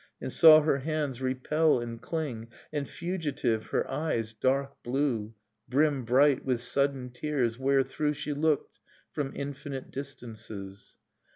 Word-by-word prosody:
And -, -, -3 dB
saw 155 Hz, -1 st, +9 dB
her 150 Hz, -2 st, +1 dB
hands 145 Hz, -3 st, -2 dB
repel 130 Hz, +3 st, +2 dB
and 115 Hz, -1 st, -6 dB
cling, 130 Hz, -8 st, -4 dB, 0.3 s
And, 145 Hz, -2 st, -2 dB
fugitive, 150 Hz, -10 st, -2 dB
her -, -, 0 dB
eyes, 115 Hz, -8 st, -2 dB
dark 135 Hz, +4 st, -1 dB
blue, 120 Hz, -4 st, -1 dB, 0.3 s
Brim 140 Hz, -1 st, +2 dB
bright 135 Hz, +3 st, +4 dB
with 125 Hz, -3 st, 0 dB
sudden 135 Hz, 0 st, 0 dB
tears, 125 Hz, -3 st, -1 dB
wherethrough 135 Hz, +2 st, +1 dB
She 150 Hz, 0 st, -4 dB
looked 150 Hz, 0 st, 0 dB, 0.3 s
from 140 Hz, -2 st, -3 dB
infinite 140 Hz, -1 st, -6 dB
distances. 110 Hz, -7 st, -8 dB
135 Hz, 125 wpm, -29 LUFS, 120-150 Hz, 0.3 s, saw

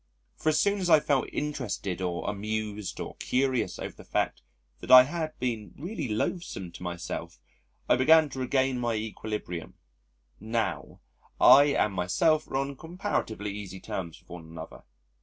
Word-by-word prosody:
For 155 Hz, -, 0 dB
as 155 Hz, -, +2 dB
soon 200 Hz, 0 st, +2 dB
as 180 Hz, -2 st, -1 dB
I 155 Hz, -, +8 dB
felt 145 Hz, -3 st, 0 dB
interested 115 Hz, -10 st, -3 dB
or 90 Hz, -1 st, -2 dB
amused 105 Hz, 0 st, -3 dB
or -, -, -6 dB
curious 130 Hz, -7 st, 0 dB
over -, -, -6 dB
the -, -, -14 dB
fact -, -, -1 dB, 0.4 s
that -, -, -10 dB
I 130 Hz, 0 st, +11 dB
had 155 Hz, +3 st, -4 dB
been 115 Hz, -4 st, -3 dB
really 165 Hz, -1 st, -4 dB
loathesome 105 Hz, -, -3 dB
to -, -, -12 dB
myself 90 Hz, -1 st, -5 dB, 0.5 s
I -, -, +4 dB
began 160 Hz, +4 st, +6 dB
to 130 Hz, -, -7 dB
regain 130 Hz, 0 st, +1 dB
my 120 Hz, -2 st, 0 dB
equilibrium. 105 Hz, -5 st, -5 dB, 0.6 s
Now, 115 Hz, +2 st, -3 dB, 0.4 s
I 135 Hz, +3 st, +9 dB
and 105 Hz, -, +2 dB
myself 155 Hz, -, +2 dB
are 135 Hz, -, -2 dB
on 135 Hz, 0 st, -2 dB
comparatively 160 Hz, -, -3 dB
easy 100 Hz, -2 st, -7 dB
terms 85 Hz, -4 st, -5 dB
with -, -, -29 dB
one 85 Hz, -2 st, -8 dB
another. 80 Hz, -6 st, -10 dB
120 Hz, 160 wpm, -28 LUFS, 100-145 Hz, 0.6 s, I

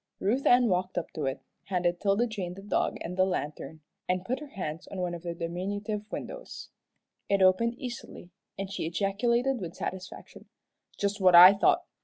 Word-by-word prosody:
Ruth 245 Hz, +8 st, 0 dB
Ann 245 Hz, 0 st, +6 dB
walked 185 Hz, -2 st, -1 dB
up 175 Hz, -, -3 dB
to 150 Hz, -3 st, -2 dB
it, 135 Hz, +1 st, -3 dB, 0.2 s
handed 175 Hz, -2 st, 0 dB
'Tilda 205 Hz, +3 st, +2 dB
Jane 195 Hz, -6 st, -5 dB
the 195 Hz, -, -11 dB
dog 205 Hz, -, 0 dB
and 180 Hz, -, -5 dB
the 185 Hz, -, +3 dB
lantern, 160 Hz, -3 st, -4 dB, 0.3 s
and 180 Hz, 0 st, 0 dB
put 255 Hz, +5 st, -2 dB
her 300 Hz, -, -9 dB
hands 175 Hz, -, -6 dB
on 195 Hz, -, -8 dB
one 180 Hz, -1 st, -2 dB
of 170 Hz, -, -6 dB
the 170 Hz, -1 st, -5 dB
diminutive 205 Hz, +6 st, -4 dB
windows. -, -, -7 dB, 0.6 s
It 200 Hz, -1 st, +3 dB
opened 230 Hz, +6 st, +3 dB
easily, 240 Hz, -8 st, -8 dB, 0.3 s
and 195 Hz, 0 st, -5 dB
she 195 Hz, -, -3 dB
ejaculated 235 Hz, +8 st, 0 dB
with 170 Hz, -2 st, -6 dB
satisfaction, 185 Hz, 0 st, -7 dB, 0.5 s
"Just 200 Hz, 0 st, -1 dB
what 185 Hz, -2 st, +6 dB
I 180 Hz, +3 st, +11 dB
thought. 200 Hz, -, +3 dB
190 Hz, 180 wpm, -28 LUFS, 175-215 Hz, 0.6 s, I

